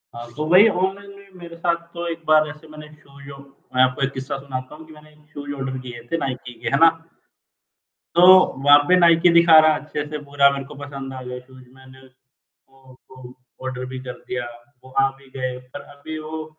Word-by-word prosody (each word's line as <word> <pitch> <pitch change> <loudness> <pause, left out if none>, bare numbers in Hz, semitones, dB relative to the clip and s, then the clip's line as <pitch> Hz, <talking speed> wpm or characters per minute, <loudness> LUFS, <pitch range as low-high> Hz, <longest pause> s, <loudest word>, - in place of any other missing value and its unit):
हाँ, 120 0 -8
तो 155 - -2
वही 185 +5 +7
ऑनलाइन 195 +1 -3
में 200 - -18
मेरे 170 -1 -10
साथ 170 0 0 0.2
तो 170 0 -5
एक 165 0 -6
बार 155 0 +4
ऐसे 155 +2 -12
मैंने 155 0 -12
शोयू 140 -1 -14 0.4
मैं 130 - +4
आपको 130 +1 0
एक 135 - 0
किस्सा 135 +2 -5
सुनाता 130 -1 -7
हूँ 160 +1 -14
कि 155 - -14
मैंने 155 0 -17 0.2
शूज़ 145 0 -7
ऑर्डर 135 -1 -5
किए 120 -2 -9
थे 165 - 0
नाइकी 130 -4 -5
के, - - -6
है 140 - +1
ना? 165 0 +8 1.3
तो 175 - +5 0.4
वहाँ 145 0 +8
पे 180 - +5
नाइकी 170 -1 +5
दिखा 170 -1 +7
रहा 155 0 +5
है - - -4
अच्छे 150 -1 -5
से 150 0 -6
पूरा 140 0 +3
मेरे 140 -1 -5
को 150 +2 -12
पसंद 135 -1 -8
आ 130 - -8
गया 125 0 -7
शूज़, 130 0 -17
मैंने 130 0 -17 0.5
वो 135 0 -29
उसको 130 0 -18
शूज़ 125 0 -12 0.3
ऑर्डर 130 -1 -5
भी - - -5
कर 125 - -8
दिया, 125 -1 -4 0.4
वो 130 - -15
आ 135 - +3
भी 135 0 -20
गए। 130 -1 -4 0.2
पर 145 - -6 0.2
अभी 155 +2 -8
वो 155 0 -7
140 Hz, 215 wpm, -21 LUFS, 130-155 Hz, 1.3 s, ना